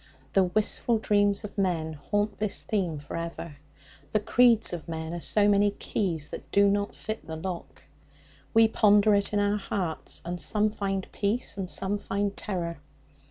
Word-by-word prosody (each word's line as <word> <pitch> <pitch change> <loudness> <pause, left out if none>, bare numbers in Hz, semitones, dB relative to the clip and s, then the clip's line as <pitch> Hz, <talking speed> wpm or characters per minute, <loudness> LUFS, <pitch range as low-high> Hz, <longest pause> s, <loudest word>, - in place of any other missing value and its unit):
The 195 -1 +5
wistful 215 +4 +1
dreams 205 -1 +2
of 210 - -8
men 165 -5 0
haunt 205 +7 -2
this 210 -1 -1
theme 180 -7 -1
for 145 0 -8
ever; 165 -2 -5 0.5
the 215 - +2
creeds 230 0 +4
of 165 -4 -6
men 160 0 -4
are 175 - -3
so 205 +4 +2
many 205 0 +4
keys 175 -6 -2
that - - -8
do 200 0 +5
not 205 0 0
fit 220 0 -6
the 160 - -5
lock. 175 +2 -6 0.7
We 225 -1 +6
ponder 210 -1 +5
it 200 0 +1
in 205 - +1
our 205 0 +2
hearts, 185 -5 -3
and 175 0 -4
some 210 0 +1
find 195 -2 -2
peace, 215 +5 -1
and 190 -2 -4
some 195 +2 -1
find 200 0 -2
terror. 170 -6 -4
200 Hz, 170 wpm, -27 LUFS, 175-210 Hz, 0.7 s, We